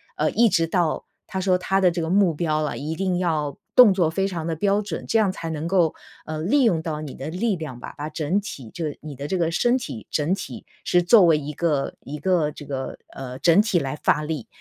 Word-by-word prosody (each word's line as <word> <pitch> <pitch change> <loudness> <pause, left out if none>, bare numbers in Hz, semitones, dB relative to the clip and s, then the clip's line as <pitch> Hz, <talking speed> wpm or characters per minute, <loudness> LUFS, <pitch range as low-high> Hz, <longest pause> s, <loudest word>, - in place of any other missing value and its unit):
呃， - - +1
一 235 +1 +4
直 165 -4 +2
到 170 -1 0 0.2
他 190 - -3
说 185 -1 +3
他 195 +1 0
的 180 - +5
这 170 0 -2
个 160 - -2
目 190 -2 +3
标 155 -1 0
啊， 150 - -2
一 155 +3 -4
定 185 0 0
要 155 -5 -1 0.2
动 250 -5 +9
作 180 -4 +2
非 195 +4 0
常 170 -5 -4
地 165 - -1
标 200 +5 +1
准， 205 - -5
这 - - +2
样 210 -4 +3
才 165 -3 -6
能 160 0 -3
够， 170 -3 +2 0.3
呃， 155 0 -4
利 260 - +3
用 185 -9 +3
到 155 -2 -4
你 150 -3 -7
的 135 +3 -6
力 205 +4 0
量 155 -8 -7
吧， - - -8
把 150 - -4
整 155 +5 0
体 140 - -8
就 165 - -3
是 150 - -4
你 150 -2 -8
的 140 +2 -5
这 190 - -1
个 165 -2 +1
身 240 +8 +2
体 175 - -7
整 150 +3 0
体 - - -8 0.2
是 175 - +3
作 185 +3 +6
为 165 -2 +5
一 150 0 -5
个 150 -3 -1
一 150 +2 -7
个 165 -2 +1
这 145 - -10
个， 135 -2 -4
呃， 130 -1 -8
整 170 +5 +5
体 205 -6 +1
来 135 0 -3
发 150 - +3
力， 150 -6 -4
165 Hz, 265 characters per minute, -23 LUFS, 150-190 Hz, 0.3 s, 动